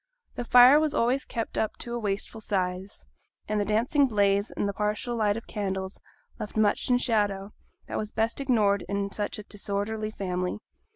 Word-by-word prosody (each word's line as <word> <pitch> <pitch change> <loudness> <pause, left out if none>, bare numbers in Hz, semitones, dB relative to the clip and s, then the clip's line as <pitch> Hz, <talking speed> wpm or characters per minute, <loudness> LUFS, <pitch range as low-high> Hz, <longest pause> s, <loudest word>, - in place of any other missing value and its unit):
The 245 - -4
fire 250 +5 +8
was 310 -1 0
always 250 +3 +1
kept 230 -1 -3
up 220 - -1
to 235 - -6
a 240 - -2
wasteful 205 +1 -3
size, 190 -1 -3 0.4
and 215 0 0
the 205 - 0
dancing 235 +7 +2
blaze 200 -2 +2
and - - -2
the 200 - -2
partial 210 +4 -1
light 215 -2 +1
of 230 - -7
candles 190 -2 -4 0.4
left 210 - -6
much 215 +2 +2
in 250 - +5
shadow 205 -4 0 0.3
that - - -3
was 215 - -3
best 225 +5 -1
ignored 210 -7 +2
in 200 0 -1
such 205 +2 -2
a 210 - -7
disorderly 205 +1 -3
family. 180 - -3
210 Hz, 180 wpm, -27 LUFS, 200-230 Hz, 0.4 s, fire